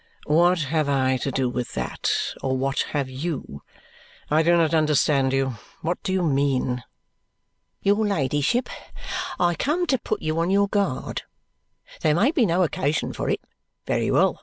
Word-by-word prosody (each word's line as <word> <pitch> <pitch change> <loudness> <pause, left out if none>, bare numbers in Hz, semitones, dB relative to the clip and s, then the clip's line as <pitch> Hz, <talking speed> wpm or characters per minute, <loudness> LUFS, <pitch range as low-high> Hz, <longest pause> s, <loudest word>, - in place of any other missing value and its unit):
"What 175 +3 +4
have 155 0 0
I 130 -1 +2
to 135 - -2
do 130 -1 0
with 125 0 -4
that, - - -2 0.3
or 130 0 0
what 135 +1 -1
have 140 -3 -1
you? 130 - -5 0.7
I 155 +1 +5
do 170 +1 +4
not 165 -1 +2
understand 150 -3 +3
you. 135 -3 0 0.2
What 170 +3 -2
do 190 - -3
you 185 -1 +1
mean?" 135 -4 +1 1.0
"Your 205 +2 +3
ladyship, 165 - +1 0.7
I 175 -1 +3
come 310 - 0
to 265 -6 +1
put - - -3
you 155 +1 -1
on 170 +2 +1
your 200 +1 +3
guard. 200 -9 -1 0.8
There 150 -1 +2
may 225 - +3
be 270 -10 +2
no 180 +2 +2
occasion 150 -2 -1
for - - -3
it. - - 0 0.4
Very - - 0
well. - - +3
155 Hz, 160 wpm, -24 LUFS, 135-180 Hz, 1.0 s, I